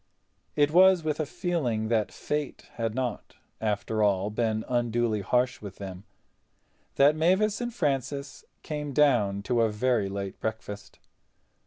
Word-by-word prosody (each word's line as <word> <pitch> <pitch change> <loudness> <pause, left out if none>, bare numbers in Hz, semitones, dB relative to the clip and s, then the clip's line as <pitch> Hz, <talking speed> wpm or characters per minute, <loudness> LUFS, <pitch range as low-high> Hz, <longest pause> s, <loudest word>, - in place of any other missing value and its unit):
It 145 0 +3
was 185 0 +6
with 155 -1 -1
a 155 - -1
feeling 135 - -1
that 110 -3 +1
Fate 150 -2 -4
had 115 -1 -3
not, 125 -4 -3 0.3
after 110 0 -1
all, 100 0 +2
been 110 0 -1
unduly 120 -3 0
harsh 125 +4 0
with 100 -3 -8
them 95 0 -8 0.9
that 145 +2 +5
Mavis 190 +7 +2
and 240 0 -2
Francis 140 - -2 0.2
came 150 -2 -4
down 115 -9 +3
to 120 +2 +1
a 115 - +3
very 110 -1 0
late 100 -1 -5
breakfast. 105 -2 -6
120 Hz, 140 wpm, -27 LUFS, 105-150 Hz, 0.9 s, was